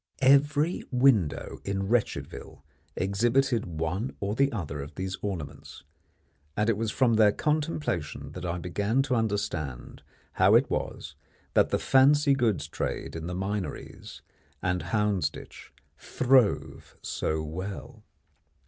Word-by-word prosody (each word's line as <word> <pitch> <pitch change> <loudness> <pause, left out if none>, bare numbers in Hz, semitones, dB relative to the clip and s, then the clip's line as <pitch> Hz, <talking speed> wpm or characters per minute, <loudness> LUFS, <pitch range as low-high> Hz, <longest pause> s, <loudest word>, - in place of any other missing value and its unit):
Every 145 +4 +4
window 125 - +2
in 100 0 -2
Wretchedville 115 +1 -2 0.3
exhibited 115 +5 +1
one 85 +8 -3
or 100 +1 -2 0.2
other 75 -9 -4
of 70 - -9
these 95 0 -4
ornaments, 75 -9 -6 0.7
and 105 +2 +3
it - - 0
was 110 +1 -2
from 120 +1 +2
their 105 -2 +6
contemplation 150 - -2
that - - -8
I 90 0 -2
began 100 +9 0
to 135 -2 -2
understand 100 - -3 0.3
how - - +4
it - - +4
was - - -3 0.4
that - - +4
the - - +1
"fancy 140 +2 +4
goods" 110 - +1
trade 80 - -4
in 80 0 -5
the 90 - -4
Minories 95 +1 -5 0.4
and 90 -1 -1
Houndsditch 105 -8 -2 0.3
throve 130 -4 +1
so 80 0 -2
well. 95 +6 -7
105 Hz, 120 wpm, -28 LUFS, 90-125 Hz, 0.7 s, their